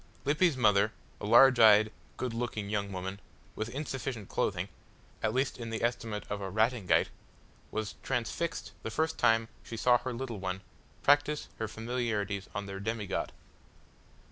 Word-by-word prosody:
Lippy's 150 Hz, 0 st, +3 dB
mother, 105 Hz, -2 st, +4 dB, 0.3 s
a -, -, -4 dB
large 130 Hz, +3 st, +7 dB
eyed, 110 Hz, -1 st, +7 dB, 0.3 s
good 125 Hz, -2 st, -2 dB
looking 110 Hz, -3 st, -3 dB
young 100 Hz, -1 st, -1 dB
woman, 95 Hz, +1 st, -4 dB, 0.4 s
with 110 Hz, +1 st, -3 dB
insufficient 130 Hz, -5 st, -4 dB
clothing -, -, 0 dB, 0.5 s
at 110 Hz, -, +1 dB
least 130 Hz, +2 st, 0 dB
in 115 Hz, -1 st, -5 dB
the 115 Hz, 0 st, -3 dB
estimate 115 Hz, -3 st, -1 dB
of 100 Hz, 0 st, -4 dB
a 95 Hz, -, -3 dB
Ratingaite 110 Hz, 0 st, +2 dB, 0.6 s
was 110 Hz, -1 st, -3 dB
transfixed 135 Hz, +6 st, -2 dB
the -, -, -4 dB
first 160 Hz, 0 st, -1 dB
time 115 Hz, 0 st, +4 dB
she 115 Hz, -, -7 dB
saw 120 Hz, +2 st, +5 dB
her 130 Hz, +1 st, -4 dB
little 120 Hz, -3 st, -4 dB
one 95 Hz, 0 st, -3 dB, 0.4 s
practise 145 Hz, +1 st, +3 dB
her 110 Hz, -, -1 dB
familiarities 110 Hz, -3 st, -2 dB
on 100 Hz, -, -2 dB
their 100 Hz, 0 st, -6 dB
demigod. 105 Hz, 0 st, -2 dB
115 Hz, 150 wpm, -31 LUFS, 105-125 Hz, 0.6 s, large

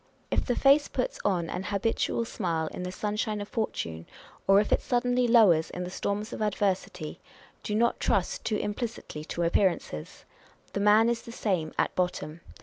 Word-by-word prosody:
If -, -, +2 dB
the 245 Hz, -, +1 dB
face 280 Hz, +2 st, +5 dB
puts -, -, -2 dB
on 180 Hz, -4 st, +1 dB
an 180 Hz, +4 st, -4 dB
habitual 225 Hz, +3 st, 0 dB
smile 170 Hz, -8 st, -2 dB
in -, -, -5 dB
the 180 Hz, 0 st, -4 dB
sunshine 210 Hz, +2 st, -2 dB
of 205 Hz, -, -5 dB
fortune, 85 Hz, -, -3 dB, 0.4 s
or 195 Hz, +1 st, +7 dB
if 210 Hz, -, 0 dB
it -, -, +3 dB
suddenly 245 Hz, 0 st, +1 dB
lowers 205 Hz, -9 st, +5 dB
in 180 Hz, -, -5 dB
the 180 Hz, -, -6 dB
storms 205 Hz, +3 st, -3 dB
of -, -, -5 dB
adversity, 200 Hz, -2 st, -1 dB, 0.4 s
do 210 Hz, -, -3 dB
not 235 Hz, +2 st, +2 dB
trust -, -, 0 dB
too 215 Hz, -, 0 dB
im 210 Hz, -, -2 dB
plicitly 210 Hz, -9 st, -6 dB
to 170 Hz, -, -2 dB
appearances; 170 Hz, -, 0 dB, 0.5 s
the -, -, -1 dB
man 210 Hz, +2 st, +5 dB
is 235 Hz, -1 st, 0 dB
the 235 Hz, -, -10 dB
same 185 Hz, -9 st, -1 dB
at -, -, +1 dB
bottom. 175 Hz, -3 st, -2 dB
205 Hz, 180 wpm, -28 LUFS, 180-230 Hz, 0.5 s, or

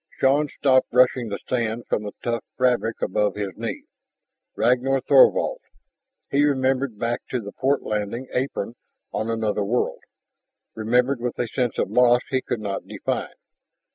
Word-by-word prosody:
Shann 140 Hz, +3 st, +3 dB
stopped 130 Hz, -2 st, +3 dB
brushing 125 Hz, -1 st, +3 dB
the 100 Hz, -, -3 dB
sand 120 Hz, -1 st, -1 dB
from -, -, 0 dB
the 105 Hz, -1 st, -6 dB
tough 115 Hz, -1 st, -1 dB
fabric 125 Hz, -3 st, +1 dB
above 105 Hz, +2 st, +1 dB
his 100 Hz, -4 st, -4 dB
knee. -, -, -5 dB, 0.7 s
Ragnar 130 Hz, +2 st, +2 dB
Thorvald... -, -, +4 dB, 0.7 s
He 140 Hz, +1 st, +3 dB
remembered 135 Hz, -4 st, +1 dB
back 115 Hz, +2 st, -1 dB
to 125 Hz, -, -1 dB
the 100 Hz, -3 st, -7 dB
port 135 Hz, +5 st, 0 dB
landing 105 Hz, +4 st, -3 dB
apron 125 Hz, -4 st, -2 dB, 0.4 s
on 110 Hz, -, -2 dB
another 110 Hz, -2 st, 0 dB
world, 120 Hz, +5 st, -1 dB, 0.7 s
remembered 125 Hz, +4 st, +1 dB
with 125 Hz, -1 st, -3 dB
a 120 Hz, -, -1 dB
sense 125 Hz, +1 st, -1 dB
of -, -, -1 dB
loss 125 Hz, 0 st, +5 dB
he 130 Hz, -1 st, +1 dB
could 120 Hz, -3 st, -3 dB
not 100 Hz, -2 st, -4 dB
define. -, -, -3 dB
120 Hz, 150 wpm, -23 LUFS, 110-130 Hz, 0.7 s, loss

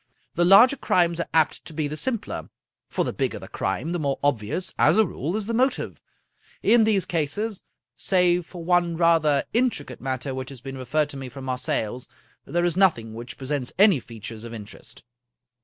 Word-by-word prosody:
The 175 Hz, -, +2 dB
larger 235 Hz, +9 st, +7 dB
crimes 175 Hz, -6 st, +2 dB
are 170 Hz, -, -2 dB
apt 160 Hz, -2 st, +2 dB
to -, -, -10 dB
be 155 Hz, -2 st, -1 dB
the 150 Hz, -, -5 dB
simpler, 230 Hz, +7 st, -4 dB, 0.4 s
for -, -, -1 dB
the -, -, -3 dB
bigger -, -, -1 dB
the -, -, -9 dB
crime, 160 Hz, +6 st, -2 dB
the 175 Hz, -, -1 dB
more 140 Hz, -3 st, -1 dB
obvious, 140 Hz, -, 0 dB
as -, -, +5 dB
a 220 Hz, -, +6 dB
rule, 165 Hz, 0 st, -3 dB
is 215 Hz, -1 st, -2 dB
the 230 Hz, -, -3 dB
motive. 255 Hz, +2 st, 0 dB, 0.6 s
In 230 Hz, -2 st, +5 dB
these 205 Hz, -4 st, +2 dB
cases, 180 Hz, +7 st, -2 dB, 0.3 s
save 180 Hz, -2 st, +2 dB
for 175 Hz, -3 st, -9 dB
one 175 Hz, -1 st, +2 dB
rather 160 Hz, -4 st, +3 dB
intricate 225 Hz, -, 0 dB
matter 130 Hz, +1 st, -3 dB
which 130 Hz, 0 st, -5 dB
has 135 Hz, -3 st, -10 dB
been 135 Hz, +2 st, -7 dB
referred 145 Hz, +4 st, 0 dB
to 140 Hz, -, -7 dB
me 135 Hz, -1 st, -6 dB
from 135 Hz, +2 st, -9 dB
Marseilles, 125 Hz, -2 st, -2 dB, 0.4 s
there 175 Hz, +1 st, 0 dB
is 175 Hz, -2 st, +1 dB
nothing 155 Hz, -, +2 dB
which 120 Hz, +3 st, -8 dB
pre 135 Hz, -, -8 dB
sents 140 Hz, -2 st, -2 dB
any 195 Hz, -6 st, +6 dB
features 115 Hz, -1 st, -9 dB
of 115 Hz, 0 st, -7 dB
interest. 110 Hz, +1 st, -10 dB
155 Hz, 190 wpm, -24 LUFS, 130-180 Hz, 0.6 s, larger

